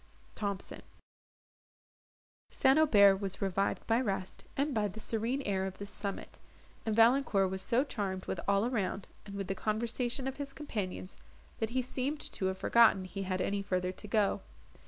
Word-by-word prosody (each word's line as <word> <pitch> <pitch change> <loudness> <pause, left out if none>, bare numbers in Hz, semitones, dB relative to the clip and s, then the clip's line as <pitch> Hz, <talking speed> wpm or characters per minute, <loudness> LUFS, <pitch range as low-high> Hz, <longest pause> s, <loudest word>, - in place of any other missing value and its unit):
THOMSON 200 -2 -4 1.7
St. 270 +3 +4
Aubert 200 -10 +6
was 195 -1 -4
revived 195 0 0
by 230 +2 +2
rest, 195 -5 -3
and 280 +1 +1
by 215 -3 +1
the 205 +2 -8
serene 230 +5 0
air 190 -3 0
of 190 - -7
this 200 0 -5
summit; 200 -1 -6 0.5
and 220 - +1
Valancourt 225 -5 +4
was 190 0 -2
so 240 +6 +2
charmed 195 -8 -3
with - - -3
all 200 +2 +3
around, 205 -5 -1 0.2
and 200 - -7
with 200 0 -3
the 195 - -2
conversation 235 +5 -1
of 265 - -4
his 280 -1 -5
companions, 200 -10 -4 0.4
that 220 - 0
he 255 +2 0
seemed 260 +4 -2
to 190 - -1
have 190 0 -2
forgotten 220 -3 +5
he 195 +2 -6
had 185 -1 -1
any 200 +1 0
further 185 -2 -1
to 210 - -10
go. 210 -1 +2
205 Hz, 170 wpm, -32 LUFS, 195-240 Hz, 1.7 s, Aubert